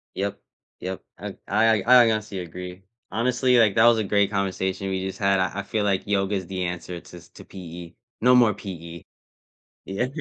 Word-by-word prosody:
Yep, 100 +1 -3 0.4
yep, 95 +1 -5 0.2
I - - -7
I 110 0 +3
I 125 +2 +7
I 115 - +3
honestly, 105 -3 -3
agree. 90 +2 -8 0.3
Honestly, 125 +3 +2
like, 110 -2 +4
that 115 0 +5
was 120 -1 +6
a - - 0
great 100 0 +2
conversation 95 -1 -2
we 95 0 -2
just 95 - -5
had, 100 -1 +2
I 95 +2 -1
I - - -3
feel 105 +1 -2
like 100 -2 0
yoga’s 100 -2 0
the 95 -1 -3
answer 90 0 -5
to 90 - -13
s 85 0 -15
to - - -14
PE. 85 -2 -10 0.3
No 125 +1 +6
more 115 -4 +5
PE. 85 -5 -9 0.8
Yeah, 100 +6 -2
100 Hz, 195 wpm, -24 LUFS, 90-110 Hz, 0.8 s, I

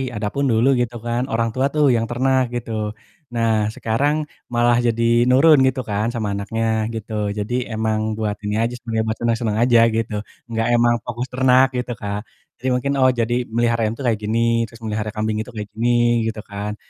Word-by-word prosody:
Adapun 110 +7 -1
dulu 115 +3 +3
gitu 120 -1 -1
kan 120 +2 -1
orang 115 -2 0
tua 130 +2 +1
tuh 150 -1 +4
yang 115 -1 0
ternak 130 +2 +2
gitu. 115 -1 -4 0.6
Nah 115 -1 +2 0.2
sekarang 140 +7 0 0.4
malah 120 0 +3
jadi 115 0 0 0.3
nurun 145 +3 +6
gitu 130 0 0
kan 105 +2 0
sama 110 -3 -2
anaknya 110 +3 -3 0.3
gitu, 110 0 -7 0.3
jadi 105 +4 -3 0.3
emang 110 -1 0 0.2
buat 105 -2 -1
ini 105 0 -2
aja 120 +1 -1
sebenernya, 115 -1 -2
buat 110 0 -2
seneng-seneng 115 -2 0
aja 120 -1 +5 0.2
gitu, 115 -1 -2 0.4
enggak 115 0 0
emang 120 0 +4
fokus 120 +1 -4
ternak 130 +1 +4
gitu 125 -1 -3
Kak, 105 0 -5 0.3
jadi 130 - -4
mungkin, 140 +3 -1
"Oh 130 - +5
jadi 120 +2 0
melihara 115 0 +2
ayam 110 - -3
tuh 135 - -7
kayak 115 -4 +1
gini," 115 +2 +1
terus 115 0 -16
melihara 105 0 -3
kambing 110 0 -1
itu 110 - -4
kayak 105 -1 -5
gini 120 0 +2
gitu 110 -1 -4
kan. 100 +1 -5
115 Hz, 190 wpm, -21 LUFS, 110-120 Hz, 0.6 s, nurun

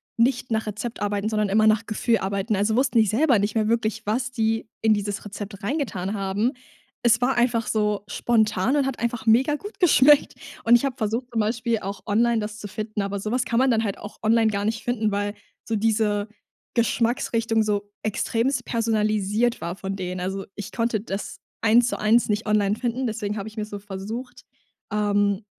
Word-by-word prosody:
nicht 245 +1 +1
nach 220 0 0
Rezept 210 +3 -5
arbeiten, 205 0 -1
sondern 210 -2 0
immer 215 +2 +4
nach 215 +1 +3
Gefühl 225 +1 +1
arbeiten. 200 +2 -1
Also 205 +3 +1
wussten 260 -3 +3
die 220 - +5
selber 240 +3 +3
nicht 205 +2 -1
mehr 215 -1 +2
wirklich, 225 -1 0
was 245 +4 -1
die 225 -2 -1
in 220 -1 +4
dieses 205 0 -3
Rezept 205 0 -7
reingetan 205 - -2
haben. 200 +4 0 0.5
Es 235 -1 +4
war 250 +2 +2
einfach 240 -1 +1
so 210 -2 0
spontan 220 +3 +1
und 280 - +2
hat 270 -2 -3
einfach 235 0 -2
mega 255 +6 +4
gut 410 +7 -9
geschmeckt. 295 -3 +5 0.3
Und 235 +1 +6
ich 260 - -2
habe 270 -3 -2
versucht 225 +4 -2
zum 225 - +2
Beispiel 225 +1 0
auch 195 0 -6
online, 230 +2 +2
das 215 0 -5
zu 205 - -6
finden, 215 +1 -4
aber 200 0 -3
so 215 +3 -4
was 250 0 +1
kann 235 0 0
man 260 -1 +4
dann 225 0 +2
halt 200 -2 -2
auch 205 - -10
online 225 +1 +4
gar 200 -1 -2
nicht 220 +1 -2
finden, 220 -3 0
weil 205 +1 -1 0.3
so 225 - -1
diese 210 -1 +1 0.5
Geschmacksrichtung 230 -1 +1
so 205 -1 -2
extrem 235 +4 0
personalisiert 215 0 +1
war 170 +1 -3
von 195 0 -5
denen. 180 -1 -4
Also, 190 +1 -3
ich 205 -1 -7
konnte 230 -3 0
das 200 -2 -5 0.2
eins 230 +2 +5
zu - - -2
eins 220 +3 +3
nicht 210 +1 0
online 210 -1 +2
finden, 245 +2 -2
deswegen 210 -2 -3
habe 200 - -5
ich 220 - -10
mir 215 - -1
so 205 -1 -7
versucht, 205 +6 -7 0.5
ähm, 205 -1 +1
220 Hz, 195 wpm, -24 LUFS, 205-235 Hz, 0.5 s, Und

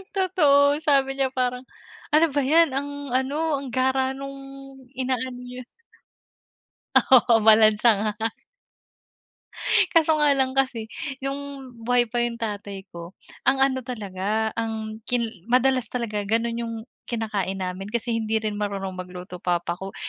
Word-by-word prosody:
Totoo, 295 -6 +4
sabi 275 -2 +3
niya 270 - +2
parang 250 0 0 0.5
ano 310 +2 +6
ba 285 - +2
yan 320 +5 +5
ang 280 +2 -2 0.2
ano, 265 +3 0 0.2
ang 275 - -7
gara 265 0 +1
nung 275 0 -6 0.6
ina-ano 255 -1 -2
yun. 250 0 -9 1.3
Oo, 245 -3 +6
malansa 215 +1 +6
nga. 215 0 0 1.8
Kaso 320 -1 +4
nga 295 -1 +4
lang 260 -1 +2
kasi 240 -5 0 0.4
yung 275 -1 -5
buhay 245 -1 +3
pa 240 +1 -1
yung 235 -1 -3
tatay 205 -3 -5
ko, 170 0 -9 0.4
ang 270 0 +4
ano 260 -1 +1
talaga 215 -1 -2
ang 220 -1 -3
kin 245 -1 +1 0.2
madalas 255 -1 +3
talaga 225 -4 -2
ganun 230 +2 0
yung 230 -1 -4 0.3
kinakain 205 -5 -2
namin, 185 +2 -5
kasi 235 +2 -3
hindi 220 0 -1
rin 215 -1 -2
marunong 200 -2 -3
magluto 180 0 -8
papa 175 0 -1
ko. 195 0 -7
240 Hz, 135 wpm, -24 LUFS, 210-265 Hz, 1.8 s, ano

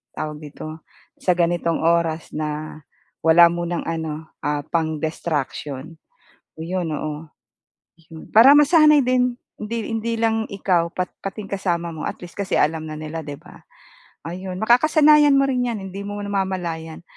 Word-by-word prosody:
tawag 150 -1 -5
dito, 155 +1 -9 0.4
sa 185 - +2
ganitong 170 -1 +1
oras 165 -1 +1
na 155 0 -4 0.4
wala 170 +1 +7
munang 170 0 -3
ano, 160 -1 -4
ah, 145 0 -1
pang-destruction, 155 -2 -3 0.6
'yon, 175 +1 -3
oo. 155 +1 -4 0.8
Hmm, 160 - -10
para 230 +5 +9
masanay 300 0 +6
din, 250 -1 +1 0.2
hindi 220 +1 -4
hindi 225 +1 -2
lang 225 -1 +1
ikaw, 180 -4 0
pat 180 -1 -3
pati 195 +2 -5
yung - - -14
kasama 175 -3 -1
mo 155 - -6
at - - -6
least 175 -1 -11
kasi 200 -2 -1
alam 155 +1 +1
na 155 - -6
nila, 155 +1 -5
'di 145 -1 -6
ba? - - -16 0.6
Ayun, 180 +2 -6
makakasanayan 295 +4 +5
mo 275 - +4
rin 250 -2 0
'yan, 235 -3 -2
hindi 195 +2 -6
mo 205 0 -5
namamalayan, 180 -5 -3
170 Hz, 145 wpm, -22 LUFS, 160-215 Hz, 0.8 s, para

